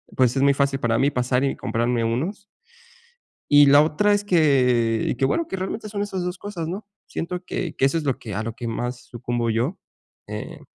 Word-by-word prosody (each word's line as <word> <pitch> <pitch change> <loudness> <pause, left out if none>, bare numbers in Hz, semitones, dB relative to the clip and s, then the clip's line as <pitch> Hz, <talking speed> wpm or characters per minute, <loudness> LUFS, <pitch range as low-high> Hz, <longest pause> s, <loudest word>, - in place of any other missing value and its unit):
pues, 125 0 +3
es 135 - +1
muy 140 - +5
fácil 140 -1 +1
para 115 -2 +1
mí 140 - +3
pasar 125 +1 0
y 135 - 0
comprarme 120 0 -1
unos. 155 - -2 1.1
Y 145 0 +8
la 145 +1 +7
otra 205 +7 +2
es 205 - +2
que 125 - +3
y, - - -1
que 135 - 0
bueno, 320 - 0
que 190 - -3
realmente 195 +3 -4
son 205 -1 -3
esas 190 -3 -3
dos 180 +1 -4
cosas, 180 -6 -5
¿no?, 195 +3 -5 0.2
siento 180 +2 -4
que 175 -2 -4
que - - 0
eso 135 +5 +2
es 155 - -4
lo 135 -3 0
que 110 - -8
a 105 +3 -2
lo 115 - -3
que 120 -1 -5
más 120 +2 -4
sucumbo 120 0 -2
yo, 120 - 0 0.5
eh, - - -7
140 Hz, 220 wpm, -23 LUFS, 120-180 Hz, 1.1 s, Y